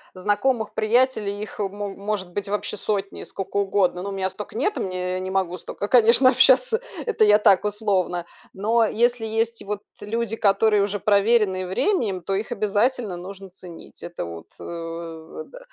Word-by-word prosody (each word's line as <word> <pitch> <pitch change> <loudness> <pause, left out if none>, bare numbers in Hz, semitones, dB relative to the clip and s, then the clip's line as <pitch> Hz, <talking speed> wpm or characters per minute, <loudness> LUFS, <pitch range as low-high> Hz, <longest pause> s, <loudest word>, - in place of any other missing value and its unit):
знакомых, 210 +4 0
приятелей 220 -2 +1
их 210 +1 -8
мо 205 0 -3
может 200 -2 -4
быть 200 +1 -3
вообще 210 +1 -2
сотни, 200 -1 -3
скока 195 +1 -5
угодно. 195 -3 +1
Но 200 - -4
у - - -5
меня 190 -1 -1
стока 210 - -9
нет, 410 - 0
мне, 185 -1 -3
э, - - -1
я 185 - -2
не 185 0 -4
могу 190 -2 -1
стока, 205 - -5
конечно, 240 +2 +6
общаться. 260 - +4 0.2
Это 460 - +2
я 210 0 +6
так 205 -2 +4
условно, 195 -5 -1 0.3
но 225 +4 +2
если 240 +2 +1
есть 225 +1 -1
вот 205 0 -4 0.2
люди, 225 +1 -2
которые 210 0 +3
уже 205 +1 -1
проверенные 200 -2 +2
временем, 200 - 0
то 195 - -2
их 205 +4 -2
обязательно 215 0 0
нужно 190 +2 -9
ценить. 180 -2 -13
Это 170 - -6
вот, 85 -1 -9
э, 165 - -7
да, - - -12
205 Hz, 170 wpm, -23 LUFS, 190-225 Hz, 0.3 s, конечно